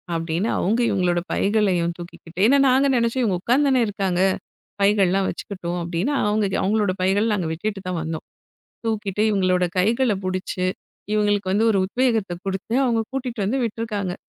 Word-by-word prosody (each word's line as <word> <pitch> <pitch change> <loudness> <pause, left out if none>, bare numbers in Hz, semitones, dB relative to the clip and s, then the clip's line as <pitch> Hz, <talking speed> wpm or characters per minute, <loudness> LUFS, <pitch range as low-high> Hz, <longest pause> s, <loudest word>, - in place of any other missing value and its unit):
அப்படின்னு 165 +5 -1
அவங்க 220 +6 +1
இவங்களோட 180 -2 +1
பைகளையும் 195 -5 +1
தூக்கிக்கிட்டு, 175 0 -10
ஏன்னா 275 +4 +5
நாங்க 260 +2 +4
நினைச்சோம், 235 +2 +1
இவங்க 190 -6 0
உக்காந்துதானே 260 +3 +3
இருக்காங்க, 195 -3 -1 0.6
பைகள் 200 -1 +4
எல்லாம் 195 +1 +1
வச்சுக்கிட்டும் 180 -2 -5
அப்படின்னா, 175 - -1
அவங்க 210 0 +1 0.2
அவங்களோட 205 0 +1
பைகளை 195 +4 +2
நாங்க 185 -5 -1
விட்டுட்டுதான் 185 -1 -3
வந்தோம். 160 0 -5 0.6
தூக்கிட்டு 210 -2 -1
இவங்களோட, 185 -3 +2
கைகளை 225 +3 +2
புடிச்சு 185 0 -2 0.5
இவங்களுக்கு 205 -2 +1
வந்து 210 +3 +2
ஒரு 200 - +2
உத்வேகத்தை 220 -4 0
கொடுத்து, 195 +4 -3
அவங்க 235 -3 +1
கூட்டிட்டு 250 -4 -4
வந்து 250 +7 0
விட்டு 225 0 -4
இருக்காங்க. 200 -5 -3
200 Hz, 145 wpm, -22 LUFS, 185-225 Hz, 0.6 s, ஏன்னா